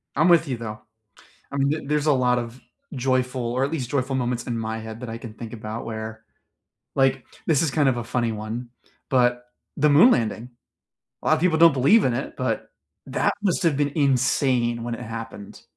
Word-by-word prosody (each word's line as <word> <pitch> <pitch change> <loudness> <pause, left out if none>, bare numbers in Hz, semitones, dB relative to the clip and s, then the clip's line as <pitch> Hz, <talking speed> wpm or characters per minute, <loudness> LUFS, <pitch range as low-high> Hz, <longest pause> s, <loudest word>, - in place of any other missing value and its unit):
I'm 155 +4 +3
with 170 -2 +5
you 130 -3 -2
though, 110 -2 -6 0.7
I - - -3
mean 140 0 +2
th 155 +1 -1
there's 150 0 0
a 150 - +5
lot 125 -2 +2
of 120 +1 -6 0.3
joyful 130 -1 0
or 130 +2 +1
at 140 - -2
least 130 -7 -3
joyful 135 -1 0
moments 120 -1 -1
in 120 -2 -2
my 110 0 -3
head 110 0 -8
that 125 -2 -6
I 115 - -5
can 115 -2 -9
think 115 0 -8
about 110 0 -6
where, 110 0 -6 0.7
like, 135 -1 +2 0.2
this 155 -4 +3
is 160 -4 +1
kind 145 -2 +3
of 125 - 0
a 120 - -3
funny 115 0 -1
one, 110 +3 -5 0.4
but 125 -1 +2 0.3
the 150 +1 +4
moon 165 - +7
landing. 115 - -1 0.7
A - - -8
lot 155 - +5
of 155 - -2
people 165 -2 +2
don't 165 0 +7
believe 140 - +4
in 125 - +1
it, - - -4
but, - - -2 0.4
that - - +1
must 195 -2 0
have 165 -5 +2
been 145 0 0
insane 130 -4 +2
when 120 0 -3
it - - -12
happened. 115 -3 -8
125 Hz, 210 wpm, -24 LUFS, 115-140 Hz, 0.7 s, moon